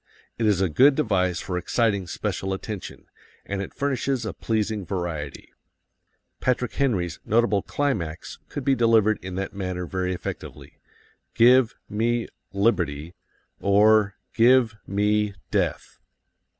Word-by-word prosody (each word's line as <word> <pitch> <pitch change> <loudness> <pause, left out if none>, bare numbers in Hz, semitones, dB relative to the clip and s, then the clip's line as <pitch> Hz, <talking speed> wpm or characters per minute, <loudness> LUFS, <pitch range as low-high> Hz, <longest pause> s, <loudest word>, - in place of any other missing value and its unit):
It 115 - +2
is 100 -3 +2
a 95 - +3
good 135 - +5
device 95 - +1
for 90 -1 -3
exciting 100 -1 0
special 95 +2 -3
attention, 100 +1 -7 0.4
and 100 0 -3
it 100 - -6
furnishes 135 -3 -1
a 110 - -3
pleasing 110 -2 -1
variety. 85 -6 -5 0.9
Patrick 125 -1 0
Henry's 95 - 0
notable 110 -2 +2
climax 95 - -3
could 145 - -5
be 135 - +4
delivered 115 -3 +3
in 95 -1 -6
that 95 +1 -4
manner 90 -2 -4
very 90 +1 -2
effectively: 90 - -7 0.6
"Give 120 +1 +5
me 115 +3 0 0.2
liberty 85 -7 0 0.5
or 105 +1 +4 0.2
give 120 -1 +4
me 105 +1 +1 0.2
death." - - -1
105 Hz, 125 wpm, -24 LUFS, 95-115 Hz, 0.9 s, good